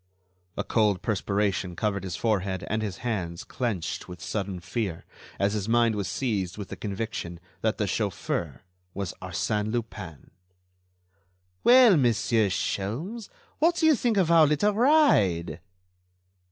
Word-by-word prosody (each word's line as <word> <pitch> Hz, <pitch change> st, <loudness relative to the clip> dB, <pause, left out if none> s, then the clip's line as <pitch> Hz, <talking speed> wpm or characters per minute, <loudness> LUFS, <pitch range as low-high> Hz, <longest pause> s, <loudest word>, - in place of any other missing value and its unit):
A -, -, -1 dB
cold 105 Hz, -4 st, +1 dB
perspiration 100 Hz, -3 st, -1 dB
covered 100 Hz, 0 st, -1 dB
his 90 Hz, -3 st, -4 dB
forehead 95 Hz, -3 st, -1 dB
and 110 Hz, +1 st, 0 dB
his 100 Hz, -5 st, -4 dB
hands 90 Hz, -8 st, -3 dB
clenched 105 Hz, -10 st, -3 dB
with 90 Hz, -2 st, -9 dB
sudden 95 Hz, +1 st, -4 dB
fear, 95 Hz, -1 st, -4 dB, 0.3 s
as 100 Hz, +1 st, +1 dB
his 105 Hz, 0 st, -2 dB
mind 120 Hz, -1 st, +3 dB
was 100 Hz, -3 st, -2 dB
seized 100 Hz, -8 st, -2 dB
with 100 Hz, -3 st, -7 dB
the -, -, -6 dB
conviction 100 Hz, -4 st, -5 dB, 0.2 s
that 110 Hz, 0 st, 0 dB
the 105 Hz, -, 0 dB
chauffeur 90 Hz, -, -2 dB, 0.3 s
was 100 Hz, -3 st, -3 dB
Arsène 105 Hz, +4 st, -2 dB
Lupin. 105 Hz, -, -6 dB, 1.3 s
"Well, 245 Hz, -6 st, +7 dB
Monsieur 115 Hz, -4 st, +2 dB
Sholmes, 145 Hz, -, -3 dB, 0.3 s
what 335 Hz, +3 st, +3 dB
do 325 Hz, -, +1 dB
you 315 Hz, -, +7 dB
think 240 Hz, -5 st, 0 dB
of 175 Hz, -4 st, +3 dB
our 165 Hz, -2 st, +7 dB
little 150 Hz, +8 st, +2 dB
ride?" 105 Hz, -, +3 dB
105 Hz, 140 wpm, -26 LUFS, 95-120 Hz, 1.3 s, Well